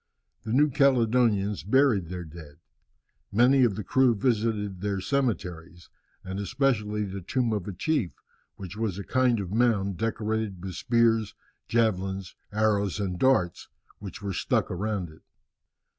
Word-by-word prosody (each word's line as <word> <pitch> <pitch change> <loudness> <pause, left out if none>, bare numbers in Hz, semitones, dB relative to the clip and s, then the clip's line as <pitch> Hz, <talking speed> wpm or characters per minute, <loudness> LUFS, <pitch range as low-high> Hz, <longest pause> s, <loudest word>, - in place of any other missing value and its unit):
The 110 - -6
New 145 +4 +4
Caledonians 115 -6 +2
buried 115 - +2
their 90 -1 -5
dead. 80 -2 -12 0.8
Many 125 +5 +5
of 115 -5 +2
the 105 - -4
crew 130 +4 +3
visited 105 -4 -1
their 100 -1 -1
cemeteries, 90 - -3 0.3
and 95 +1 -5
especially 105 -2 0
the 100 -1 -5
tomb 120 +5 -1
of 100 -4 -3
a - - -3
chief, 130 - -1 0.4
which 95 -1 -8
was 105 -4 -2
a 100 - -5
kind 125 -1 +2
of 95 -3 -5
mound, 105 -5 +1
decorated 110 -3 -2
with 95 - -5
spears, 115 -3 +1 0.3
javelins, 95 -5 0 0.2
arrows, 105 -2 +1
and 90 -3 -3
darts, 130 -10 +2 0.3
which 105 +1 -9
were 100 -1 -3
stuck - - 0
around 95 -2 -3
it. 80 - -18
105 Hz, 145 wpm, -27 LUFS, 95-120 Hz, 0.8 s, Many